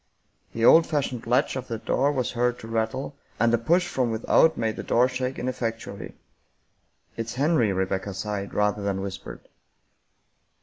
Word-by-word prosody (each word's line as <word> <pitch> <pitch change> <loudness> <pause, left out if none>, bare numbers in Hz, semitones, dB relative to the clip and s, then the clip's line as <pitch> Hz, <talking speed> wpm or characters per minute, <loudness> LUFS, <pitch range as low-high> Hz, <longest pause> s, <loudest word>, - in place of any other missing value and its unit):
The 115 0 0
old 165 +5 +7
fashioned 130 -6 -2
latch 130 +4 +2
of 130 -1 -5
the 115 - -3
door 135 +5 +1
was 130 -4 -1
heard 120 0 0
to 110 - -10
rattle, 115 +5 -2 0.2
and 115 +1 +3
a - - +5
push 175 +9 +2
from 130 -8 0
without 115 +8 +3
made 110 -1 -1
the - - -3
door 125 +2 +3
shake 130 0 -3
ineffectually. 115 -5 -4 0.5
" - - -41
It's 115 0 -4
Henry," 135 -6 +2
Rebecca 95 +1 -2
sighed 100 0 -4
rather 105 0 +1
than 100 -1 -2
whispered. 95 -1 -7
115 Hz, 165 wpm, -25 LUFS, 105-130 Hz, 0.5 s, old